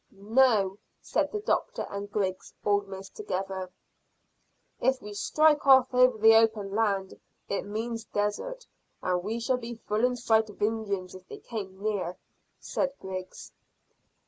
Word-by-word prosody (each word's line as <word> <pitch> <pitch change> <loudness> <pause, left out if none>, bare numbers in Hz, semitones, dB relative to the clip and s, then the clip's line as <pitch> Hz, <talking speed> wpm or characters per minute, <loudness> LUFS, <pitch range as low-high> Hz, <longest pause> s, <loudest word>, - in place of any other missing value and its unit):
"No," 205 -1 +3 0.2
said - - -1
the 425 - -3
doctor - - -1
and 200 0 -6
Griggs, 190 -3 -2
almost 195 -2 -1
together. 190 - -4 1.1
"If 260 +1 +2
we 210 -4 -9
strike 300 +7 +3
off 260 -1 +7
over 250 -2 +5
the 220 +1 +7
open 220 -3 +3
land 200 -3 0 0.3
it 200 - -2
means 225 +2 -4
desert, 340 - -2 0.4
and 180 -1 +1
we 220 +5 -3
shall 250 +2 +1
be 235 -1 -6
full 220 0 -2
in 250 0 +3
sight 220 -2 +2
of 205 - -13
Indians 205 -4 -1
if 185 0 -12
they - - -8
came 195 -5 -7
near," 195 -4 -1 0.4
said 275 -1 -1
Griggs. 185 -1 -7
215 Hz, 145 wpm, -28 LUFS, 195-240 Hz, 1.1 s, off